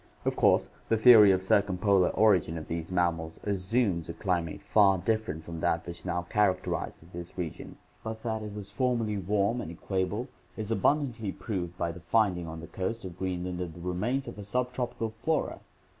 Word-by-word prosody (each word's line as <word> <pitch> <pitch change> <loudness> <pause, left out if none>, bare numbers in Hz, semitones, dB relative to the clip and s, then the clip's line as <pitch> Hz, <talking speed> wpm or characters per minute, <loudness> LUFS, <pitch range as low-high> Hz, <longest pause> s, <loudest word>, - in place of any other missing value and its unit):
Of - - +1
course - - +3 0.2
the 115 - +3
theory 110 -3 +9
of 95 -1 +1
circumpolar 95 -1 +3
origin 95 -7 +3
of 80 - -7
these 85 +1 -4
mammals 85 -3 0
assumes 100 -3 0
a - - -3
climate 85 -5 -2
far 100 -3 +5
different 110 -5 -1
from 85 0 -7
that 80 +1 0
which 85 0 -8
now 85 0 -1
characterizes 95 -4 0
this 85 0 -9
region; 85 -4 -5 0.3
but 110 0 -6
that 110 -2 -2
it 105 -1 -7
was 105 -2 -6
formerly 115 -3 0
warm 100 +5 +1
and 80 - -6
equable 95 +7 -2 0.3
is 110 0 -4
abundantly 115 -2 +1
proved 90 -6 -4
by 85 - -1
the 85 - -10
finding 90 -2 +1
on 80 0 -7
the - - -7
coast 95 +4 -4
of 90 -1 -8
Green 90 -2 -2
land 90 -1 -4
of 85 -3 -5
the - - -10
remains 105 +10 -1
of - - -8
a - - -6
sub 125 +5 -1
tropical 120 -3 -3
flora. 150 +9 -1
95 Hz, 190 wpm, -29 LUFS, 85-110 Hz, 0.3 s, theory